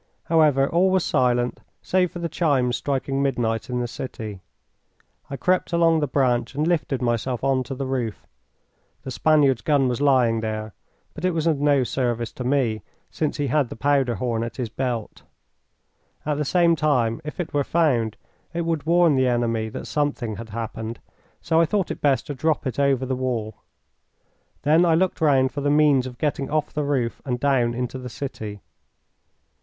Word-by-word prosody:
However, 150 -4 +3
all 180 +5 +3
was 185 -2 +2
silent 125 -3 +1 0.2
save 185 -1 +2
for - - -9
the 170 -1 -2
chimes 140 -7 +1
striking 135 +1 -2
midnight 120 -5 -1
in 125 0 -1
the 120 - -2
city. 110 -5 -7 0.9
I 140 - -5
crept 180 +5 0
along 165 -1 +4
the 145 - 0
branch 125 -1 0
and 150 +2 0
lifted 150 -7 0
myself 120 +1 -1
on 135 -1 +2
to 135 - -5
the 135 +1 -4
roof. 125 -5 -3 0.8
The 130 - -6
Spaniard's 140 -3 +3
gun 140 -1 +2
was 125 +2 -2
lying 125 -5 +3
there, 110 -1 -4 0.4
but 155 - -9
it 185 -2 +1
was 160 -1 -1
of 160 -4 +2
no 145 -2 +3
service 120 -2 -2
to 125 - -7
me, 125 -5 +1 0.3
since 155 -1 -2
he 145 - 0
had 140 -1 +1
the - - -7
powder 135 -1 +1
horn 115 0 -1
at 115 - -5
his 125 -4 -3
belt. 120 -2 -4 1.0
At 150 -1 -1
the 150 - 0
same 170 +2 +3
time, 140 -5 +1
if 150 +3 -8
it 175 - -4
were 145 -1 +2
found, 130 -10 +1 0.4
it 170 - 0
would 165 -2 -2
warn 170 -2 +4
the 130 -1 +2
enemy 115 -2 0
that - - -7
something 140 -8 -2
had 115 +1 -8
happened, 110 +1 -5 0.4
so 165 0 +2
I - - +4
thought 195 +1 0
it - - -6
best 140 -2 +2
to 145 - -4
drop 150 +2 0
it 130 +1 -3
over 135 -2 +2
the 130 - -2
wall. 120 -4 -3 1.1
Then 155 +4 +4
I 165 -2 +4
looked 180 0 0
round 135 -4 +3
for 145 - -4
the 145 - +1
means 145 -3 +4
of 125 -1 -9
getting 140 -1 -1
off 155 0 -1
the 150 - -1
roof 130 -5 -1
and 125 -3 -2
down 125 -4 +2
into 125 +1 -3
the 125 0 -7
city. 110 -6 -6
135 Hz, 190 wpm, -23 LUFS, 120-150 Hz, 1.1 s, along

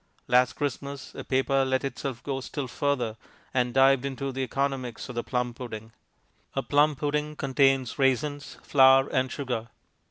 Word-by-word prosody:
Last 125 +1 +4
Christmas 140 -1 -4
a - - -7
paper 135 +1 +1
let 130 0 0
itself 135 -2 -4
go 135 -2 -3
still 140 +1 -5
further, 125 -4 -1 0.4
and 125 -2 +1
dived 135 0 +4
into 140 0 -3
the 135 +1 -4
economics 130 -2 -2
of - - -5
the 120 0 -2
plum 125 -1 -2
pudding. 115 -2 -8 0.6
A 135 - 0
plum 145 +3 +3
pudding 150 +1 -2
contains 135 -2 +1
raisins, 140 +2 0
flour, 135 -1 +6
and 130 -2 0
sugar. 125 -5 -3
135 Hz, 155 wpm, -27 LUFS, 125-140 Hz, 0.6 s, flour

